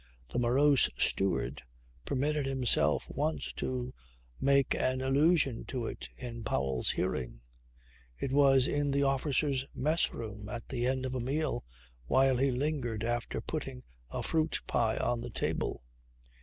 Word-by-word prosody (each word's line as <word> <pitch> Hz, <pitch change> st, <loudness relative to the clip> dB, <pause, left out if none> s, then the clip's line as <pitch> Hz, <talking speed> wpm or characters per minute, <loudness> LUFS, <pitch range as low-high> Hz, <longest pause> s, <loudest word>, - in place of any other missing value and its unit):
The -, -, +1 dB
morose 135 Hz, +4 st, +4 dB
steward 95 Hz, +8 st, 0 dB, 0.4 s
permitted 145 Hz, +1 st, 0 dB
himself 130 Hz, -3 st, +2 dB
once 155 Hz, +2 st, -2 dB
to 130 Hz, 0 st, -3 dB, 0.5 s
make 140 Hz, 0 st, +3 dB
an 130 Hz, 0 st, 0 dB
allusion 140 Hz, 0 st, +2 dB
to 125 Hz, -3 st, -3 dB
it -, -, -6 dB
in 120 Hz, -2 st, -6 dB
Powell's 65 Hz, -, 0 dB
hearing. -, -, -2 dB, 0.8 s
It 135 Hz, -, -3 dB
was 135 Hz, -2 st, +5 dB
in 145 Hz, 0 st, 0 dB
the 140 Hz, 0 st, +2 dB
officers' 135 Hz, 0 st, +1 dB
mess 155 Hz, +4 st, +2 dB
room 105 Hz, -2 st, -7 dB
at 120 Hz, 0 st, -6 dB
the 125 Hz, -2 st, -1 dB
end 130 Hz, 0 st, 0 dB
of 130 Hz, -, -3 dB
a 130 Hz, -, -2 dB
meal 140 Hz, -, -1 dB, 0.4 s
while 130 Hz, -, +4 dB
he 135 Hz, +2 st, +2 dB
lingered 125 Hz, -4 st, -1 dB
after 120 Hz, -1 st, -2 dB
putting 135 Hz, -3 st, -5 dB, 0.3 s
a -, -, -4 dB
fruit 160 Hz, -1 st, +1 dB
pie 115 Hz, -2 st, +1 dB
on 120 Hz, -1 st, 0 dB
the 120 Hz, -, -6 dB
table. 100 Hz, -, -2 dB
130 Hz, 145 wpm, -31 LUFS, 120-140 Hz, 0.8 s, was